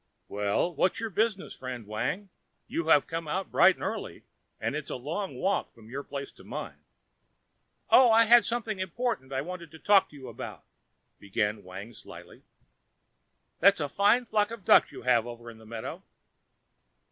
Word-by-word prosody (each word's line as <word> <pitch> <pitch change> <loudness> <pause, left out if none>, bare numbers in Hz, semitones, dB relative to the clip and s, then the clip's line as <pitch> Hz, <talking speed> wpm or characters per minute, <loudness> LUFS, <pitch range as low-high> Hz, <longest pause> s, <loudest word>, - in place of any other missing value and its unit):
"Well, 105 - 0
what's 180 +8 +1
your 225 -1 -4
business, 210 0 -1
friend 125 -3 -7
Wang? 125 - -3 0.4
You 165 -1 -3
have 150 -3 +5
come 165 -1 -5
out 185 +6 -3
bright - - +6
and - - -10
early, - - -4 0.4
and - - -2
it's - - -4
a - - -3
long 160 +10 -4
walk 195 +2 -1
from 110 0 -15
your 140 +2 -4
place 140 -1 -6
to - - -17
mine." - - -7 1.1
"Oh, 255 -2 +8
I 225 0 +6
had 235 +1 +7
something 225 -4 -2
important 185 - -2
I 135 0 -1
wanted 175 0 -7
to 160 - -13
talk 200 +3 +4
to - - -16
you 135 -2 -10
about," 115 - -8 0.6
began 105 +1 -2
Wang 95 +5 -9
slyly. - - -12 1.2
"That's 200 +2 +5
a 145 - -1
fine 205 - +3
flock 210 -2 +1
of 230 -5 -9
ducks - - +6
you - - -10
have 120 -2 +3
over 120 0 -9
in 110 - -15
the 110 - -15
meadow." 115 0 -6
160 Hz, 175 wpm, -28 LUFS, -, 1.2 s, Oh